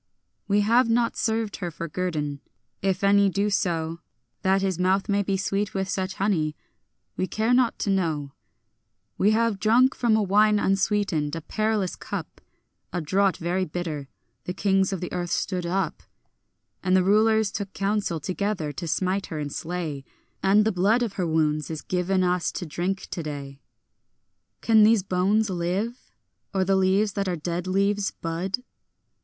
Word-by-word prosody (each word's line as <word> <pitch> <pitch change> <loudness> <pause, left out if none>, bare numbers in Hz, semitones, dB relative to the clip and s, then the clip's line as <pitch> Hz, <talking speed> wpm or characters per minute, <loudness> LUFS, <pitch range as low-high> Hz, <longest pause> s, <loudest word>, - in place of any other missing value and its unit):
We 205 +1 +3
have 230 +3 +3
not 235 0 +2
served 220 -1 -1
her 180 -3 -3
for 170 0 -6
guerdon. 155 -4 -3 0.4
If 190 0 0
any 200 0 +5
do 200 +2 0
so, 165 -4 -1 0.4
That 190 +1 +2
his 190 -3 -1
mouth 190 +2 +2
may 200 0 +2
be 195 -1 0
sweet 200 +1 -1
with 190 0 -1
such 190 -1 -2
honey, 165 -7 0 0.6
we 185 - -1
care 220 +6 0
not 245 -2 +3
to 200 - -1
know. 160 -7 -1 0.9
We 200 - +4
have 220 -2 +2
drunk 240 +5 +4
from 235 -3 +2
a 220 - +2
wine 210 +2 +4
unsweetened, 195 -6 +1
a 165 - -4
perilous 215 +2 -1
cup, - - -7 0.5
A 180 - -2
draught 190 +4 +1
very 175 +3 -1
bitter. 155 -4 -4 0.4
The 180 - -4
kings 195 -1 +2
of 190 - -3
the 180 - -5
earth 175 -1 -2
stood 180 0 -1
up, 185 -1 -1 0.8
And 185 +1 +3
the 185 - +3
rulers 215 +1 +3
took 200 -2 -4
counsel 195 -4 -1
together, 185 -1 -2
to 165 +4 -6
smite 185 +4 0
her 160 - -5
and 145 -2 -4
slay; 165 -5 -4 0.4
And 205 +2 +4
the 220 - +2
blood 205 +7 +2
of 220 -4 -3
her 180 -3 -1
wounds 155 -2 +1
is 160 -2 -5
given 185 +1 0
us 180 -1 +1
to 180 - -4
drink 180 +5 -3
today. 145 -4 -6 1.0
Can 220 -1 +5
these 215 -2 +5
bones 195 +3 +1
live? 185 +7 -2 0.5
or 190 -1 +2
the 195 +1 +2
leaves 190 +2 +2
that 200 -1 -2
are 180 - 0
dead 170 +2 -3
leaves 200 +2 +1
bud? 180 +8 -3
190 Hz, 165 wpm, -25 LUFS, 175-205 Hz, 1.0 s, any